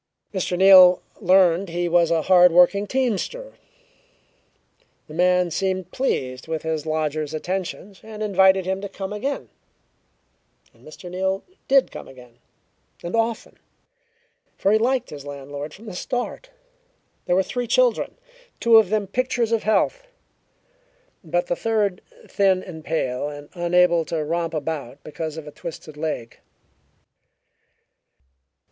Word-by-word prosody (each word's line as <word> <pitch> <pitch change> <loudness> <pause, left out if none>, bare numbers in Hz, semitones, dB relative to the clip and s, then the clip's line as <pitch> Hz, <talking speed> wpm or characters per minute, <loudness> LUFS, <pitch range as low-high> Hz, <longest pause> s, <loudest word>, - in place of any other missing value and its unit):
Mr. 185 -2 -2
Neal 185 -1 +8 0.2
learned 185 -1 +3
he 175 +1 -2
was 170 -1 +3
a 165 -2 +1
hard 180 -1 +6
working 180 +4 +4
teamster. 265 - -2 1.5
The 155 - -11
man 180 +1 +2
seemed 185 +1 -2
pleased 130 - -2
with 160 -1 -3
his 160 -1 -3
lodger's 155 -1 -2
attentions, 185 +3 -5
and 215 -1 -7
invited 190 -2 +4
him 190 +1 -2
to 200 - -6
come 195 +1 -6
again, 270 +7 -4 1.2
and - - -24
Mr. 155 +4 -12
Neal 190 +2 -2 0.2
did 270 -1 +3
come - - -9
again 125 -2 -16 0.6
and 170 - -3
often, 225 0 -2 1.0
for 195 - +1
he 215 - +4
liked 250 +2 0
his 145 -2 -8
landlord 145 +1 -7
from 210 +8 -14
the 210 - -8
start. 245 - -4 0.8
There 175 - +1
were 190 - +3
three 245 +6 -4
children, - - +1 0.4
two 230 -1 +6
of 220 -4 +4
them 210 -1 0
pictures 240 +2 -1
of 225 -1 +1
health, 360 - 0 1.2
but 175 +2 -1
the 175 - -1
third 210 -4 -1 0.3
thin 190 -2 +2
and 160 -4 -10
pale 145 -4 -2
and 145 0 -10
unable 175 -1 +3
to 160 0 -2
romp 165 +1 -2
about 145 -3 -5
because 155 0 -6
of 160 - -7
a 150 - -9
twisted 160 -1 -9
leg. 150 -7 -5
180 Hz, 135 wpm, -22 LUFS, 160-205 Hz, 1.5 s, Neal